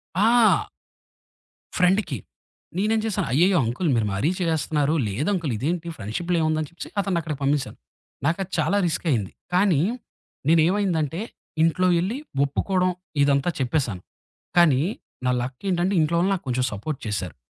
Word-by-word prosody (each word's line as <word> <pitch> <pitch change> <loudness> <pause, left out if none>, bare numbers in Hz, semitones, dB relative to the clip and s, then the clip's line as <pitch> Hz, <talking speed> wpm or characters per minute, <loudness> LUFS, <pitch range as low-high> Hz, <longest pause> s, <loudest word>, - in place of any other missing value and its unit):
ఆ! 225 +4 +4 1.1
ఫ్రెండ్‌కి. 180 - +2 0.6
నేనేం 215 +3 +2
చేశాను, 200 -4 -1
అయ్యయ్యో! 180 +6 +4
అంకులు 140 +8 -1
మీరు 110 -2 +1
మరీ 120 - +1
చేసేస్తున్నారు, 155 -3 +1
లేదంకులు 155 - -1
ఇదేంటి 165 +6 -2
ఫ్రెండ్‌షిప్‌లో 170 - -2
ఏముందని 155 -1 0
చెప్పేసి 170 - -9
అతన్నక్కడికి 170 -7 -2
పంపేసాను. 140 -1 0 0.5
నాకది 185 +4 -1
చాలా 155 +6 +2
రిస్కయింది. 135 - -1 0.2
కానీ 180 -6 +4 0.7
నేనుమైందంటే, 165 -1 +2 0.4
ఇంట్లో 185 +3 +3
ఎళ్ళి 210 +10 -2 0.3
ఒప్పుకోవడం 185 +6 0 0.3
ఇదంతా 140 +4 +2
చెప్పేశాను. 125 - -1 0.6
కానీ 150 -6 +5 0.4
నా 125 - +3
లక్కేంటంటే 175 +9 -1
ఇంట్లో 155 +2 +1
వాళ్ళు 190 +3 +2
నాక్కొంచం 130 -8 -1
సపోర్ట్ 135 +8 -4
చేశారు. 95 -5 -3
160 Hz, 115 wpm, -24 LUFS, 140-185 Hz, 1.1 s, కానీ